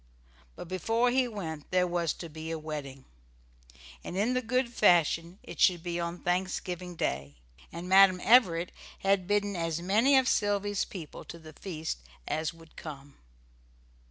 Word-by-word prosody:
But - - -8
before 225 +7 +1
he 255 0 +2
went 160 -9 -6
there 180 0 +3
was 175 -3 0
to 170 - -8
be 160 +1 -8
a 165 - -2
wedding, 145 -4 -7 1.0
and, 180 - -6
in 220 +6 +2
the 255 - +1
good 255 +2 +1
old 235 - -15
fashion, 175 -3 +3
it - - -10
should 175 -4 +4
be 175 -1 -3
on 170 +1 -4
Thanksgiving 180 -1 -2
Day, 70 - -2 0.4
and 170 +2 -7
Madam 190 -1 +6
Everett 180 -8 +5 0.3
had 195 -2 +2
bidden 205 -1 +1
as 165 -1 -1
many 220 +10 +4
of 260 -1 +3
Sylvy's 205 -2 +1
people 165 -7 -9
to 170 - -9
the 160 -1 -13
feast 160 - -5 0.3
as 155 0 -1
would 165 -1 -18
come. 140 -3 -9
180 Hz, 160 wpm, -29 LUFS, 160-205 Hz, 1.0 s, Madam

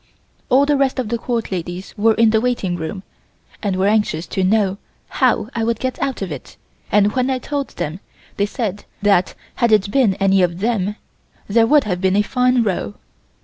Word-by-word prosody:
All 270 +3 +5
the 290 0 +2
rest 275 -1 +1
of 250 -5 -2
the 235 0 -1
Court 230 -2 -3
ladies 180 +1 -5
were 220 +1 +3
in 225 -1 +4
the 220 0 +2
waiting 235 -8 -1
room 175 +3 -5 0.6
and 200 -4 -1
were 190 +1 +1
anxious 205 -6 +1
to 190 - -2
know 200 0 +2 0.3
how - - +1
I 230 - -1
would 230 0 0
get 255 -1 -3
out 265 -7 -2
of 185 - -5
it, - - -9 0.3
and 205 0 +4
when 255 0 0
I 260 - +1
told 280 +2 -3
them 155 +5 -3 0.4
they 205 - +1
said 205 -3 -4 0.2
that 195 -3 +3 0.2
had 235 -2 +2
it 205 -2 +3
been 235 -7 +3
any 195 0 +3
of 175 -1 +1
them 210 -1 -1 0.5
there 225 +2 +3
would 295 +1 +5
have 180 -4 -3
been 190 0 +2
a 205 - +3
fine 250 +1 +2
row. 180 - -2
210 Hz, 200 wpm, -19 LUFS, 190-240 Hz, 0.6 s, All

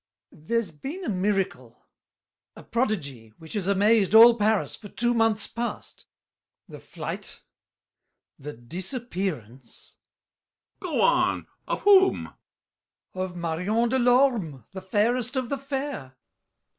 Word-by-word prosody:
There's 205 +5 -2
been 280 - -7
a - - -2
miracle, 190 - -2 0.8
A - - -12
prodigy, 140 - -3
which 160 -1 -11
has 200 -4 -2
amazed 205 +1 +3
all 230 +1 +9
Paris 215 -2 0
For 205 - -12
two 240 +4 0
months 225 -2 +2
past; 235 +1 -6 0.6
the - - -11
flight, - - -7 1.0
the 145 +2 -7
disappearance— 170 - -6 0.8
BRICHANTEAU. 365 -4 -6
Go - - +2
on! - - +2 0.2
Of - - -2
whom? 385 -2 +4 0.8
GASSÉ. 185 - -4
Of 185 -1 -6
Marion 180 +8 -1
de 260 +2 +1
Lorme, 240 - +2
The 190 - -6
fairest 235 +6 0
of 255 -2 -2
the 280 - -2
fair! 270 - -5
210 Hz, 120 wpm, -25 LUFS, 170-240 Hz, 1.0 s, all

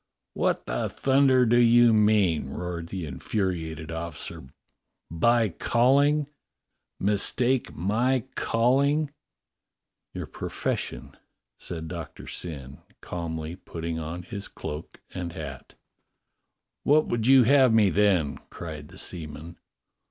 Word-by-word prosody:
"What - - 0
the - - -2
thunder 135 -2 +3
do 120 +1 +4
you 120 -1 +6
mean?" 105 -9 +3
roared 85 +2 -5
the 90 -1 -5
in 70 -3 -7
furiated 80 -6 -2
officer, 80 -5 -5 0.6
"by 115 +6 +3
calling? 140 - +3 0.7
Mistake 120 +5 +1
my 115 +8 +1
calling? 140 +6 +2 0.5
" - - -60
"Your - - -4
profession," - - -4 0.4
said 80 -2 -6
Doctor 85 -1 -7
Syn, 70 -5 -7 0.2
calmly 80 -1 -5
putting 85 -2 -5
on 80 +3 -5
his 100 +2 -6
cloak 75 +2 -7
and 85 -2 -5
hat. 70 -5 -8 1.1
"What 150 +2 +4
would 115 -1 -1
you 135 -1 +8
have 130 0 +5
me 110 -4 +4
then?" 95 -8 +2
cried 80 -3 -8
the - - -14
seaman. 80 0 -7
95 Hz, 115 wpm, -26 LUFS, 80-120 Hz, 1.1 s, you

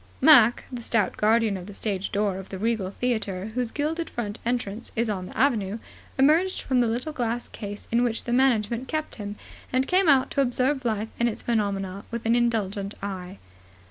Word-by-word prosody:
Mac, 245 -7 +7
the 245 -2 -5
stout 225 -4 0
guardian 220 -1 +3
of 180 0 -9
the 205 - -9
stage 200 -3 -3
door 200 -2 0
of 190 - -10
the 190 - -5
Regal 220 -2 0
Theatre, 215 -3 -2
whose 250 -1 -1
gilded 315 +5 -2
front 210 -3 -4
entrance 235 -2 -2
is 230 -1 +1
on 185 -3 -4
the - - -10
Avenue, 220 -6 +2 0.4
emerged 320 +8 +3
from 255 -2 +2
the 240 - +2
little 245 +7 -2
glass 240 -2 -2
case 205 -1 -8
in 235 +1 +3
which 230 -2 -1
the 240 - -2
management 245 -1 +2
kept 310 -1 -3
him, 205 -1 -5 0.4
and 255 +1 +2
came 365 0 +3
out 270 -2 +4
to 280 - +2
observe 260 +1 +1
life 220 -1 -1
and 235 0 +3
its 220 - -5
phenomena 200 -4 -1
with 235 -1 -5
an 230 +1 +3
indulgent 210 -4 0
eye. 190 -1 -5
230 Hz, 195 wpm, -26 LUFS, 205-250 Hz, 0.4 s, Mac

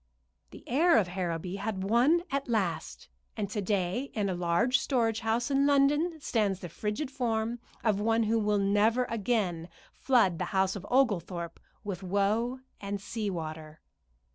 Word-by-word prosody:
The - - -13
heir 325 +7 +4
of 195 -5 +2
Harrowby 180 0 -3
had 195 -2 -3
won 250 - +3
at 275 0 -1
last, 170 - -2 0.3
and 205 - -1
to 210 - -2
day 200 +6 -1
in 205 -3 0
a - - 0
large 180 +9 +2
storage 225 -5 0
house 235 +3 -1
in 275 +1 +3
London 295 +4 +3
stands 210 -9 0
the 175 - -6
frigid 210 - -3
form 235 -3 -1 0.2
of 210 -3 +2
one 225 +1 +2
who 225 +1 +1
will 210 -1 +1
never 205 +5 +3
again 200 -7 -1 0.2
flood 220 -11 +2
the - - -1
house 190 +1 +2
of 200 0 -7
Oglethorpe 180 -9 0 0.2
with 195 -3 -5
woe 210 +7 0 0.2
and 200 0 -4
sea 210 +1 -3
water. 155 -3 -6
210 Hz, 160 wpm, -29 LUFS, 190-240 Hz, 0.3 s, heir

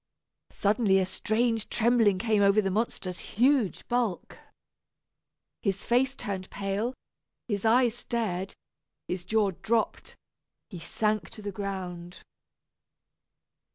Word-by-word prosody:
Suddenly 205 -1 +2
a 190 - +2
strange 220 +4 0
trembling 230 -4 +3
came 215 0 +2
over 200 +1 +5
the 195 -2 +1
monster's 190 -3 -2
huge 245 -2 +1
bulk. 235 -7 -1 1.2
His 195 -2 -1
face 255 +3 +2
turned 190 -5 -5
pale, 200 +5 -2 0.5
his 205 -2 -2
eyes 235 +1 +4
stared, 195 -6 -2 0.5
his 180 -1 -4
jaw 210 0 +2
dropped, 225 0 -1 0.6
he 180 - -7
sank 215 +5 -1
to 215 - -11
the 205 - -3
ground. 185 -3 -6
210 Hz, 110 wpm, -28 LUFS, 190-230 Hz, 1.2 s, over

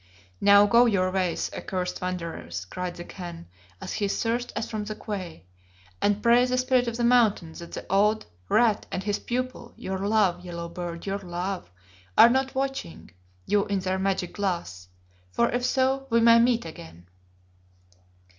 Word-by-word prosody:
"Now 200 0 +7
go 235 +4 +5
your 185 -4 +1
ways, 185 -2 -1
accursed 180 -1 -4
wanderers," 170 - -4
cried 180 - -5
the 175 - -7
Khan 175 -2 -9 0.3
as - - -6
he 205 - -1
thrust 235 +4 -1
us - - -2
from 215 -2 -4
the 215 0 -5
quay, 185 - -6 0.6
"and 205 0 +1
pray 235 +1 +5
the 255 0 0
Spirit 255 -1 +2
of 235 0 -3
the 240 - -1
Mountain 225 -9 +3
that 170 - -10
the - - -6
old 210 +3 +2 0.2
Rat 220 -2 +3
and 185 - -3
his 205 0 -1
pupil 250 -1 -4
your 190 0 -4
love, 200 -3 +1
Yellow 170 -1 -6
beard, 170 -1 -6
your 200 0 -2
love 180 - -4 0.5
are 235 - +9
not 265 +1 0
watching 265 - -4 0.3
you 205 -1 +1
in 200 - 0
their 185 0 -1
magic 190 -2 -1
glass. 170 - -3 0.5
For 235 - +2
if 245 0 -1
so 265 +1 +1
we 230 - +3
may 230 0 +7
meet 235 -2 +2
again." 85 - -11
200 Hz, 165 wpm, -26 LUFS, 180-235 Hz, 0.6 s, are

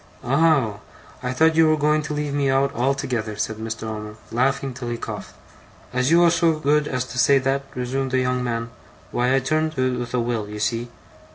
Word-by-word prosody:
'Oh! 135 -6 +2 0.4
I 125 - -2
thought 160 +5 +4
you 160 -1 +5
were 155 - +3
going 150 +1 +2
to 150 0 -4
leave 150 -1 -2
me 140 -1 +1
out 135 +1 +2
altogether,' 125 -4 -1
said 110 +1 -3
Mr. 110 0 -5
Omer, 105 -1 -5 0.2
laughing 135 +2 0
till 120 -1 -6
he 120 - -2
coughed. - - -7 0.3
' - - -25
As 125 +1 +1
you 170 +2 +5
was 170 -1 +5
so 165 -1 +3
good 150 0 +1
as 125 -2 -2
to 125 - -5
say 140 +2 +5
that,' 135 +1 0
resumed 130 +2 -2
the 130 - +1
young 125 0 0
man, 115 -1 -3 0.4
'why 125 +2 +2
I - - +4
turned 155 +4 0
to 130 -2 0
with 120 0 -4
a - - +2
will, 115 -3 -2
you 105 0 -6
see. 115 +3 -1
130 Hz, 215 wpm, -23 LUFS, 120-145 Hz, 0.4 s, you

